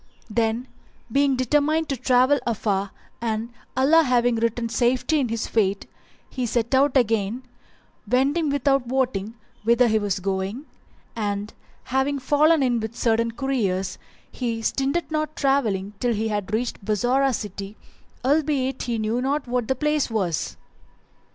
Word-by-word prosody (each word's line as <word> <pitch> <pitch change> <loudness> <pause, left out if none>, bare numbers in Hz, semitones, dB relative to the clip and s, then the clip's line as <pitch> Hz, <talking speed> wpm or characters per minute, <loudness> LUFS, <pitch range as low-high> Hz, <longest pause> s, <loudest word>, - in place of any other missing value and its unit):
[FN#378] 210 - -10
Then, 230 +2 0 0.4
being 275 +1 +3
determined 295 +5 +1
to 275 - 0
travel 255 +3 +3
afar 200 -3 0 0.3
and 225 0 -2 0.3
Allah 295 +5 +5
having 245 -4 +2
written 230 +1 0
safety 250 +6 +1
in 255 -4 0
his 230 0 -2
fate, 200 -3 0 0.4
he 255 -2 -3
set 235 +2 -1
out 275 +1 +4
again, 225 0 +1 0.7
wending 280 +6 +2
without 275 -2 +1
wotting 240 -5 -1 0.3
whither 235 +2 +4
he 220 -1 +2
was 205 -2 -1
going; 195 +7 -3 0.5
and, 205 -1 -3 0.3
having 265 +2 0
fallen 295 +3 +3
in 245 -2 +2
with 220 +1 -5
certain 230 -1 +1
couriers, 225 -7 -1 0.3
he 230 -3 -3
stinted 275 +8 -1
not 310 0 -2
travelling 220 -8 +1
till 245 -1 +1
he 220 +1 -1
had 205 -2 -3
reached 225 -1 -2
Bassorah 245 +6 +2
city 205 -2 -5 0.5
albeit 275 -2 +1
he 240 -2 -2
knew 220 +3 -1
not 275 +1 -1
what 245 -2 -1
the 265 - +1
place 300 +1 0
was. 190 -9 -2
245 Hz, 145 wpm, -24 LUFS, 220-275 Hz, 0.7 s, Allah